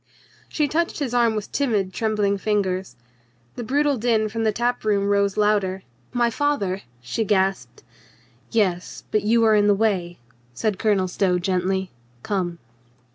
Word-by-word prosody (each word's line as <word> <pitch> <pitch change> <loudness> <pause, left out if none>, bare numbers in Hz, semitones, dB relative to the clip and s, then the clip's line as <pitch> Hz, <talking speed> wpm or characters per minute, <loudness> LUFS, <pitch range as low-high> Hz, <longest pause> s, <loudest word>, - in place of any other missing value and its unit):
She 300 -2 0
touched 335 +3 -1
his 275 -5 -3
arm 235 -2 +3
with 210 -1 -4
timid 210 -9 0
trembling 210 -3 0
fingers. 190 -7 -1 0.6
The 240 - -5
brutal 285 +3 +1
din 220 -2 +1
from 225 +2 -3
the 215 - +3
tap 240 +3 -1
room 205 -2 +1
rose 200 0 +1
louder. 200 -3 +1 0.3
"My 240 -1 +1
father 225 -9 0
!" 120 - -34
she 225 - +1
gasped. 195 -2 0 0.7
"Yes, 185 -6 -1
but 215 - +2
you 230 +2 +3
are 220 - +5
in 205 -1 +4
the 205 - +5
way," 190 -5 0 0.4
said 210 - -1
Colonel 200 -4 +2
Stow 180 0 +1
gently. 185 +1 -1 0.3
"Come." 180 -4 -2
210 Hz, 155 wpm, -23 LUFS, 190-230 Hz, 0.7 s, are